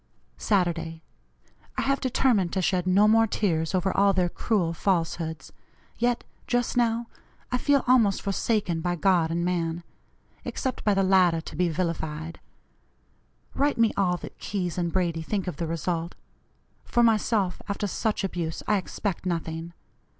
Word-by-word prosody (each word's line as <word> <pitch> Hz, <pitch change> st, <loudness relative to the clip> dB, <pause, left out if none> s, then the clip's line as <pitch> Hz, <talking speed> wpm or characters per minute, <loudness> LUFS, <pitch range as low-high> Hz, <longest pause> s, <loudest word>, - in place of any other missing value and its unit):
"Saturday. 165 Hz, -, 0 dB, 0.7 s
I -, -, +1 dB
have 275 Hz, 0 st, +1 dB
determined 245 Hz, -8 st, +2 dB
to 190 Hz, -, +1 dB
shed 180 Hz, 0 st, +1 dB
no 200 Hz, +3 st, +5 dB
more 225 Hz, +1 st, +5 dB
tears 165 Hz, -5 st, 0 dB
over 185 Hz, +1 st, 0 dB
all 200 Hz, 0 st, +4 dB
their 180 Hz, -2 st, +1 dB
cruel 180 Hz, -4 st, 0 dB
falsehoods, 165 Hz, -4 st, -2 dB, 0.5 s
yet, 240 Hz, 0 st, +1 dB, 0.2 s
just 245 Hz, -1 st, 0 dB
now, 235 Hz, -1 st, +1 dB, 0.5 s
I 250 Hz, -, +1 dB
feel 285 Hz, 0 st, +3 dB
almost 230 Hz, -6 st, +3 dB
forsaken 200 Hz, -4 st, 0 dB
by 175 Hz, +1 st, 0 dB
God 175 Hz, -2 st, +2 dB
and 170 Hz, +1 st, -1 dB
man 170 Hz, -1 st, -1 dB, 0.6 s
except 260 Hz, -1 st, -3 dB
by 205 Hz, -2 st, +3 dB
the 195 Hz, -, +3 dB
latter 185 Hz, -3 st, +4 dB
to -, -, -9 dB
be 180 Hz, +2 st, +1 dB
vilified. 160 Hz, -1 st, -3 dB, 1.1 s
Write 285 Hz, +1 st, +1 dB
me 230 Hz, -1 st, +3 dB
all 180 Hz, -3 st, +1 dB
that -, -, -10 dB
Keyes 180 Hz, -5 st, -3 dB
and 170 Hz, -1 st, -1 dB
Brady 170 Hz, -3 st, 0 dB
think 195 Hz, +3 st, -2 dB
of 180 Hz, -6 st, -4 dB
the 165 Hz, -, -2 dB
result. 165 Hz, +1 st, -2 dB, 0.7 s
For 240 Hz, -, +2 dB
myself, 215 Hz, -4 st, +2 dB
after 200 Hz, +1 st, -2 dB
such 210 Hz, +2 st, -1 dB
abuse, 170 Hz, -4 st, -3 dB
I 210 Hz, -, +3 dB
expect 195 Hz, 0 st, -3 dB
nothing. 165 Hz, -1 st, -3 dB
185 Hz, 150 wpm, -26 LUFS, 170-210 Hz, 1.1 s, no